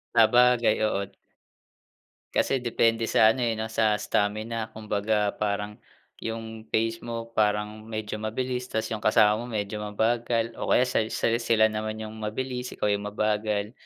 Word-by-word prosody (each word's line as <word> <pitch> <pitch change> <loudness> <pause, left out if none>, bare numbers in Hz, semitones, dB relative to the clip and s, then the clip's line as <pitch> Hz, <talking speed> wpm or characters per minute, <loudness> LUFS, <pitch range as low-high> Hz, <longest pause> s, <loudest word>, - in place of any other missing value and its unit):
Sabagay, 120 0 +5
oo. 100 -2 -1 1.3
Kasi 135 - +2
depende 115 -1 +1
sa 110 0 +5
ano, 130 - -4
eh, 115 -1 +1
no, 110 +1 -4
sa 110 -1 +2
stamina. 110 +2 -1
Kumbaga, 105 -1 0
parang 105 0 -2 0.4
yung 110 0 -6
phase 115 +1 +1
mo 115 0 -5
parang 105 -1 0
medyo 110 -1 -4
mabilis 125 +4 -3
tapos 110 -3 -3
yung 110 - -2
kasama 105 0 +5
mo 120 - -5
medyo 105 -3 -3
mabagal 115 +2 0
o - - -3
kaya - - +5
sa 125 -3 +1
sa - - +1
sila 115 -2 +3
naman 110 0 -3
yung 110 0 -7
mabilis 125 +4 -4
ikaw 105 - -1
yung 100 0 0
mabagal. 105 0 -1
110 Hz, 150 wpm, -26 LUFS, 105-115 Hz, 1.3 s, Sabagay